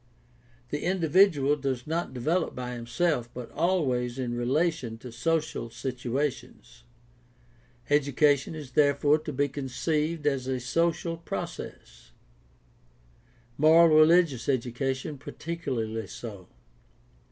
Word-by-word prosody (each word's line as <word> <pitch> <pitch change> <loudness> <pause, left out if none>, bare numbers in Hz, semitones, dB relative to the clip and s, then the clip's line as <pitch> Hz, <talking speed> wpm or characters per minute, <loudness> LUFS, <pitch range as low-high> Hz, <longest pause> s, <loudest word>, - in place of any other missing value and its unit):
The 145 - -3
individual 170 -5 +3
does 130 -4 -3
not 165 +2 -2
develop 155 +8 -1
by 125 0 -5
himself 120 +1 -1
but 125 -2 -7
always 135 -8 0
in 125 -2 -2
relation 130 -1 0
to 120 +2 -10
social 155 0 -1
situations. 125 0 -4 1.0
Education 145 0 +2
is 145 -4 -8
therefore 145 +2 +3
to 155 0 -6
be 145 +1 +1
conceived 150 +3 -2
as 135 -3 0
a 130 -1 -1
social 165 +5 0
process; - - -7 1.5
moral 160 +1 +6
religious 155 -5 +4
education 130 +3 -2
particularly 130 -10 -4
so. 100 -6 -9
140 Hz, 100 wpm, -27 LUFS, 125-160 Hz, 1.5 s, moral